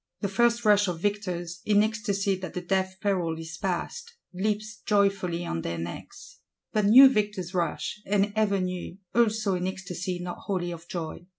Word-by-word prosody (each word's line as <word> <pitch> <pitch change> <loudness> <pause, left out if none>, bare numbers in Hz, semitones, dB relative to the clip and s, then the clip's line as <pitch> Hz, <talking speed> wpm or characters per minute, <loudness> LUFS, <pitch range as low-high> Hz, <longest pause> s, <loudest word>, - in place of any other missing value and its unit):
The 200 - 0
first 235 +3 +2
rush 205 -1 +5
of 175 -2 -3
victors, 175 -3 -2
in 210 0 +4
ecstacy 205 -3 0
that 185 -3 -7
the 180 - -2
death 190 +1 -1
peril 180 -6 0
is 160 0 -7
passed, 215 - -3 0.2
"leaps 210 +2 -2
joyfully 195 -5 +1
on 80 - -2
their 85 +1 -3
necks;" 85 +1 -8 0.3
but 215 -2 +2
new 255 +7 +10
victors 210 -7 -1
rush, 180 +4 -2
and 205 +1 +2
ever 205 -2 +2
new, 180 -1 -4 0.2
also 220 -3 +2
in 180 0 -1
ecstacy 185 -1 -4
not 175 0 -6
wholly 180 -3 -1
of 170 0 -9
joy. 170 0 -6
190 Hz, 170 wpm, -27 LUFS, 175-210 Hz, 0.3 s, new